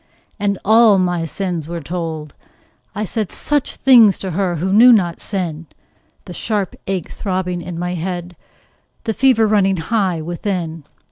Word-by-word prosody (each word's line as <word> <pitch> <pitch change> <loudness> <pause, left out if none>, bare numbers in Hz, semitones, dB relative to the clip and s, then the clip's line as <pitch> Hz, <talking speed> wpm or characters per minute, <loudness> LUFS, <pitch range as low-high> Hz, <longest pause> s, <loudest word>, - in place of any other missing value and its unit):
And 200 -1 0
all 220 -1 +6
my 175 -2 0
sins 175 -2 -4
were 170 0 -4
told; 160 -2 -5 0.6
I 210 - -2
said 210 -1 -3
Such 295 -2 -2
things 235 -7 +6
to 190 - -5
her 180 0 -1
who 185 +4 -1
knew 240 +4 +8
not 180 -7 +2
sin 170 -5 -3 0.6
The 180 - -8
sharp 205 -1 -2
ache 185 -4 -3
throbbing 185 -3 -3
in 175 0 -7
my 180 +1 -3
head, 175 0 -5 0.7
The 225 - -1
fever 255 -2 +3
running 195 -3 +2
high 185 0 0
within. 170 -1 -4
185 Hz, 150 wpm, -18 LUFS, 170-205 Hz, 0.7 s, knew